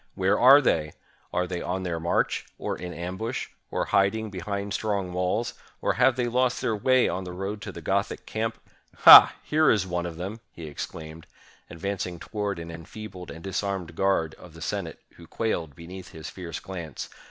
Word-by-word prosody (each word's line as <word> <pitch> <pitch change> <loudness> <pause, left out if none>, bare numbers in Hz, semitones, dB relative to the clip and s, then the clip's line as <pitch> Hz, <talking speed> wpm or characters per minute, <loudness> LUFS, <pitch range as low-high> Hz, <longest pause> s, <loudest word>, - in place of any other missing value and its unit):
"Where 95 +2 +2
are 135 +4 +9
they? 75 - +1 0.4
Are 90 +1 0
they 90 -1 -4
on 95 +1 -2
their 85 -2 -2
march, 85 +2 0
or - - -3
in 90 0 -6
ambush, 95 +8 -4 0.2
or - - -1
hiding 105 +2 +1
behind 100 +2 -4
strong 100 -4 -1
walls, 90 +6 0 0.3
or - - +1
have 125 +1 +4
they 125 -2 0
lost 125 +1 +1
their 120 -4 0
way 130 +4 +3
on 95 - -2
the 90 - -7
road 100 +3 -4
to - - -6
the - - -10
Gothic - - -1
camp? 115 +1 -2 0.5
Ha! - - +12
here 155 -1 +3
is 105 -4 +3
one 90 -1 -2
of 85 -2 -7
them!" 95 +6 -5
he 85 - -9
exclaimed, 80 +2 -7 0.4
advancing 90 0 -4
to - - -11
ward 105 -3 -2
an 85 0 -7
enfeebled 90 +3 -9
and 80 - -9
disarmed 95 -3 -3
guard 95 -5 +1
of 90 -3 -14
the - - -11
Senate, 95 -6 -3 0.2
who 85 - -13
quailed 85 -11 -2
beneath 90 +4 -10
his 80 0 -8
fierce 85 -4 -6
glance. 85 -7 -6
95 Hz, 185 wpm, -26 LUFS, 85-105 Hz, 0.5 s, Ha